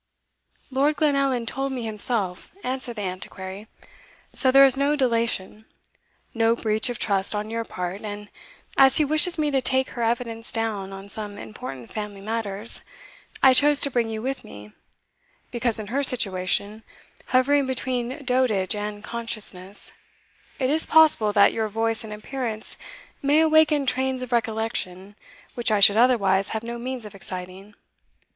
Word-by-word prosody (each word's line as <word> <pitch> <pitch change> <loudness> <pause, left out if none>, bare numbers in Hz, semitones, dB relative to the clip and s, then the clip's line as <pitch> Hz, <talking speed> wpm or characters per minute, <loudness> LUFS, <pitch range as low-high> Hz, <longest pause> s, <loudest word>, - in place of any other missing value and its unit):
"Lord 280 +3 +1
Glenallan 275 -5 +1
told 270 +3 -3
me 255 -3 -4
himself," 210 -4 0
answered 255 -2 -2
the 210 - -5
Antiquary; 190 +2 -7 0.7
"so 260 - +3
there 275 +1 +7
is 265 -1 +4
no 280 +2 +1
delation 230 -5 -1 0.7
no 225 0 +2
breach 220 0 0
of 245 - -4
trust 200 0 0
on 210 +1 -4
your 230 0 -2
part; 180 -2 -6
and 205 -1 -7 0.5
as 265 -1 +6
he 305 - +3
wishes 310 +4 +3
me 300 -1 0
to 270 -1 +1
take 260 0 +1
her 240 - -6
evidence 230 0 -2
down 215 -4 -3
on 195 +1 -9
some 205 0 -6
important 135 - -9
family 210 -2 -6
matters, 215 0 -2 0.6
I 265 -1 +8
chose 290 +2 +5
to 280 - +1
bring 235 -2 0
you 220 0 -5
with 270 +1 -3
me, 105 +1 -12 0.8
because 235 -1 -1
in 215 - -5
her 280 - +1
situation, 205 -4 +3 0.5
hovering 275 +2 +2
between 255 +2 -3
dotage 245 -7 +1
and 205 0 -5
consciousness, 210 -5 -1 0.6
it 260 0 0
is 315 +2 0
possible 310 -10 +5
that 200 -1 +5
your 220 -1 -1
voice 225 +1 0
and 220 - -9
appearance 220 0 -5 0.5
may 285 +2 +3
awaken 315 -2 +4
trains 260 0 -1
of 250 - -8
recollection 220 -4 -2 0.4
which 240 -1 0
I 210 -1 +2
should 200 0 +8
otherwise 200 -5 +3
have 220 - -7
no 235 0 -6
means 250 -1 -5
of 210 - -10
exciting. 190 +1 -7
230 Hz, 155 wpm, -24 LUFS, 205-260 Hz, 0.8 s, I